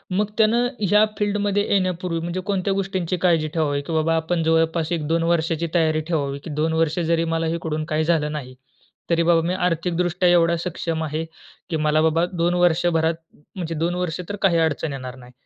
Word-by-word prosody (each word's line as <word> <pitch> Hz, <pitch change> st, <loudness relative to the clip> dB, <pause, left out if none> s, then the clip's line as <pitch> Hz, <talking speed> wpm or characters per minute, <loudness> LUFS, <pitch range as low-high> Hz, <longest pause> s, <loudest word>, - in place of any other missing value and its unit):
मग 210 Hz, +2 st, +2 dB
त्यानं 230 Hz, +2 st, +3 dB
ह्या 210 Hz, +2 st, +4 dB
फील्डमध्ये 205 Hz, 0 st, 0 dB
येण्यापूर्वी, 185 Hz, -3 st, 0 dB
म्हणजे 175 Hz, +3 st, -3 dB
कोणत्या 195 Hz, 0 st, 0 dB
गोष्टींची 190 Hz, -2 st, -2 dB
काळजी 165 Hz, -3 st, +2 dB
ठेवावी, 145 Hz, -3 st, 0 dB
की 165 Hz, -, -6 dB
बाबा 160 Hz, +1 st, +2 dB
आपण 165 Hz, +1 st, 0 dB
जवळपास 160 Hz, 0 st, +1 dB
1-2 165 Hz, 0 st, 0 dB
वर्षाची 165 Hz, 0 st, 0 dB
तयारी 155 Hz, -2 st, +2 dB
ठेवावी, 140 Hz, -4 st, -1 dB
की 165 Hz, -, -7 dB
"2 155 Hz, +2 st, -1 dB
वर्ष 160 Hz, +1 st, +1 dB
जरी 165 Hz, 0 st, +1 dB
मला 165 Hz, 0 st, 0 dB
इकडून 155 Hz, -2 st, -3 dB
काही 155 Hz, +1 st, +2 dB
झालं 155 Hz, -2 st, +1 dB
नाही, 130 Hz, -4 st, -6 dB, 0.5 s
तरी 170 Hz, 0 st, +2 dB
बाबा 170 Hz, 0 st, +4 dB
मी 180 Hz, -, 0 dB
आर्थिकदृष्ट्या 175 Hz, 0 st, 0 dB
एवढा 170 Hz, -1 st, +4 dB
सक्षम 165 Hz, -1 st, -3 dB
आहे, 155 Hz, +1 st, -3 dB, 0.5 s
की 165 Hz, -, -2 dB
मला 155 Hz, 0 st, +2 dB
बाबा 160 Hz, +2 st, +2 dB
2 175 Hz, 0 st, +1 dB
वर्षभरात 170 Hz, -2 st, +2 dB, 0.4 s
म्हणजे 170 Hz, -3 st, -4 dB
2 170 Hz, +3 st, -1 dB
वर्ष 180 Hz, -1 st, -2 dB
तर 205 Hz, -, -3 dB
काही 185 Hz, -4 st, +3 dB
अडचण 160 Hz, -2 st, 0 dB
येणार 130 Hz, -1 st, -7 dB
नाही." 125 Hz, -1 st, -14 dB
165 Hz, 180 wpm, -22 LUFS, 160-180 Hz, 0.5 s, ह्या